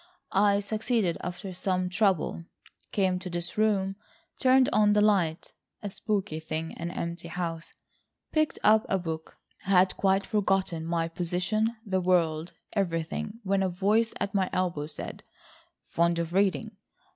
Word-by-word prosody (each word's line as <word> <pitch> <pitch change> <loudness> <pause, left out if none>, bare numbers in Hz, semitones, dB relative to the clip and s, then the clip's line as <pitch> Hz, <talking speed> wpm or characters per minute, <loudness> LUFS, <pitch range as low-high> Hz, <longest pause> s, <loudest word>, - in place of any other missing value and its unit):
I 200 +1 +4
succeeded 215 -3 0
after 180 +2 -5
some 185 0 -1
trouble, 185 -3 +1 0.5
came 185 -2 +1
to 180 0 -6
this 175 0 -4
room, 195 -3 +1 0.4
turned 260 0 +5
on 210 -1 +5
the 210 - +4
light—a 200 0 -1
spooky 195 -5 -2
thing; 160 +1 -4
an 170 +1 -3
empty 170 0 -4
house, 170 -1 -4 0.6
picked 310 -2 +1
up 215 0 +6
a 190 - +2
book, 160 -3 -5 0.2
had 185 -1 +3
quite 195 0 +2
forgotten 195 -6 0
my 165 -1 0
position, 180 +7 -1
the 190 -2 0
world, 170 -2 +1 0.2
everything, 190 +3 -2
when 195 0 +1
a 190 - +1
voice 210 +6 +2
at 200 -1 -2
my 190 -2 +1
elbow 175 -5 -1
said: - - -5 0.6
'Fond 170 0 +1
of 170 0 -2
reading? 200 +2 +1
185 Hz, 140 wpm, -28 LUFS, 170-205 Hz, 0.6 s, up